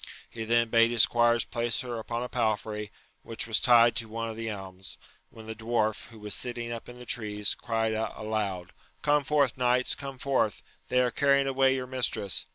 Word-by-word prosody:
— - - -19
He 115 -1 -6
then 115 0 +2
bade 115 0 +5
his 120 -2 +6
squires 120 -1 +3
place 120 -2 -1
her 120 -2 -5
upon 115 +2 -4
a - - -4
palfrey 110 -3 -2 0.3
which 115 - -3
was 110 -1 +1
tied 120 -2 +5
to 115 0 -1
one 115 +1 -4
of - - -9
the 115 0 -4
elms: 95 -2 -8 0.3
when 110 -1 -13
the 110 - -5
dwarf, 110 -1 -1
who 115 - -15
was 105 -1 -4
sitting 120 -1 -2
up 115 0 -7
in 120 - -11
the 125 - -11
tree, 105 -3 -2
cried 115 -1 -1
out 110 +1 -3
aloud. 100 -5 -3 0.3
Come 145 -1 +3
forth, 140 -3 +1
knights, 125 0 +2
come 135 -1 -6
forth! 130 -6 0 0.3
they 125 0 +3
are 125 -1 +1
carrying 140 0 +3
away 135 0 +2
your 130 -1 -3
mistress 125 -6 -1
115 Hz, 205 wpm, -28 LUFS, 110-125 Hz, 0.3 s, his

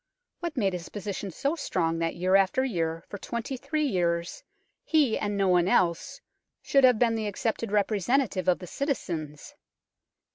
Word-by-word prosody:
What 340 -4 -5
made 195 -5 +1
his 175 -1 -6
position 200 -1 -5
so 280 - -1
strong 165 - -1
that 165 0 -1
year 185 +2 +2
after 195 +7 +3
year 165 -8 -2
for 205 - -8
twenty 235 +5 -4
three 295 +4 -1
years 170 -7 -1 0.4
he, 295 -8 +3
and 205 -1 -2
no 195 -1 +2
one 180 -1 +3
else, 190 +10 +1 0.4
should 275 -1 +3
have 250 -3 +5
been 230 0 +3
the 220 -1 -2
accepted 225 +1 -2
representative 210 +1 +1
of 180 - +4
the 180 - -9
citizens 170 - -4
200 Hz, 160 wpm, -27 LUFS, 175-255 Hz, 0.4 s, have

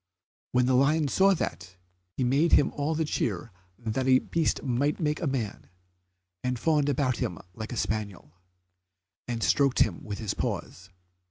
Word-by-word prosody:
When 125 0 +4
the 130 - +2
lion 145 +3 +3
saw 195 +6 +4
that, 90 - -5 0.4
he 130 - +1
made 140 +7 +2
him 145 - +5
all 145 +3 -1
the 160 0 0
cheer 110 - -2 0.3
that 120 +3 -2
a 130 -1 +7
beast 165 +4 -1
might 140 +3 0
make 150 -1 -1
a 165 - 0
man, 125 -7 -3 0.7
and 125 0 -1
fawned 150 +2 +2
about 130 -3 +1
him 85 - -2 0.2
like 110 +3 -7
a 120 - -4
spaniel, 105 -9 -3 0.9
and 115 -2 -3
stroked 140 -3 +3
him 95 -6 +1
with 105 -1 -5
his 105 -2 -3
paws. 95 +1 -4
130 Hz, 165 wpm, -28 LUFS, 110-145 Hz, 0.9 s, a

